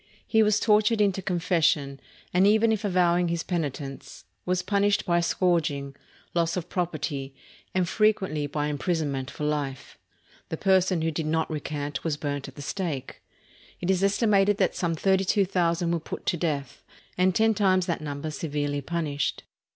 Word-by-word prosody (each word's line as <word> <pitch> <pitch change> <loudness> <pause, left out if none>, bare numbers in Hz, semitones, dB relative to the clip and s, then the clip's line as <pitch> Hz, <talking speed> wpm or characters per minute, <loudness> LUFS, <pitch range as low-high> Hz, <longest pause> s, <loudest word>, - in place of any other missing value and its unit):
He 220 - +3
was 210 -1 +3
tortured 215 +1 +3
into 195 -2 +2
confession, 165 -6 +1 0.3
and 185 +2 +5
even 220 +2 +4
if 220 -1 -1
avowing 180 -3 +2
his 170 0 -1
penitence, 145 -5 -5 0.2
was 180 0 +1
punished 200 +1 +1
by 175 -2 +2
scourging, 160 -6 0 0.4
loss 170 0 +1
of 180 - -4
property, 150 -6 -3 0.4
and 185 -2 +2
frequently 190 -8 +1
by 145 +1 -2
imprisonment 150 -3 -1
for - - -7
life. 145 -3 -3 0.5
The 160 - -3
person 185 -2 +2
who 165 - +1
did 155 0 -3
not 160 +1 0
recant 145 -1 -4
was 155 -3 -1
burned 145 -2 -3
at 135 - -12
the 145 - -8
stake. 155 -5 -4 0.6
It 180 +1 0
is 190 0 +1
estimated 200 0 +3
that - - +2
some 170 -2 -1
thirty 190 +3 +2
two 195 +1 +2
thousand 170 -2 0
were 170 - 0
put 160 - -7
to - - +1
death, 145 -6 -3 0.3
and 185 0 +2
ten 220 0 +4
times 185 -3 +2
that 170 -3 -2
number 145 +1 -4
severely 145 -2 -2
punished. 150 -2 -2
170 Hz, 165 wpm, -26 LUFS, 150-190 Hz, 0.6 s, and